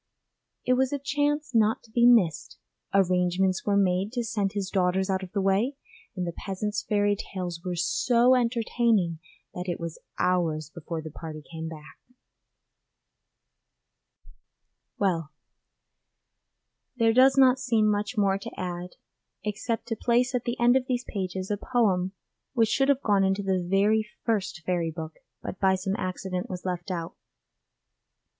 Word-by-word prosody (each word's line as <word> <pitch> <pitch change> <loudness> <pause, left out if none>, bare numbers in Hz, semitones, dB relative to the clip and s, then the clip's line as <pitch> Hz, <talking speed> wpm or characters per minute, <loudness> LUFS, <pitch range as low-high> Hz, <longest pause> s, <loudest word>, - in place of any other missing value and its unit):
It 255 - +3
was 260 0 +2
a 285 - 0
chance 290 +1 -1
not 220 -1 +3
to 225 - -20
be 235 +1 +5
missed; 200 -11 +3 0.3
arrangements 185 0 +2
were 200 -1 +3
made 190 +1 +2
to 240 -2 -1
send 210 -4 -1
his 195 -2 -3
daughters 190 0 +1
out 190 0 0
of 185 -1 -8
the 200 - -1
way, 200 +8 +1 0.4
and 180 -2 -2
the 170 - -2
peasant's 205 +4 -3
fairy 205 -1 +1
tales 180 -4 -5
were 180 -1 -3
so 235 +8 +3
entertaining 230 -7 +1 0.3
that 180 +1 -5
it 175 - -2
was 170 -1 -6 0.2
hours 160 -4 0
before 165 -1 -6
the 155 - -7
party 155 0 -8
came 160 0 -5
back. 155 -2 -11 3.0
Well, 170 -6 0 1.7
there 230 -2 +3
does 265 +3 +6
not 260 -1 +6
seem 230 -4 +2
much 210 +3 -1
more 195 -1 +2
to - - -9
add 180 0 -4 0.5
except 215 +2 -3
to 225 - 0
place 245 +2 +1
at 245 -1 -1
the 240 -1 -2
end 240 +1 +5
of 260 -1 +1
these 250 -1 -1
pages 190 -1 -4
a 205 - 0
poem 195 -6 +1 0.4
which 225 -4 +3
should 270 +3 +2
have 280 -1 +2
gone 200 -2 +3
into 195 +1 +1
the 190 -1 +1
very 210 +4 +2 0.2
first 195 -7 -1
Fairy 175 -2 0
Book, 160 -1 -7 0.2
but 185 - -6
by 190 -1 +4
some 190 +1 -2
accident 185 -1 -4
was 180 0 -6
left 180 +1 -3
out. 170 -3 -4
195 Hz, 155 wpm, -27 LUFS, 180-230 Hz, 3.0 s, does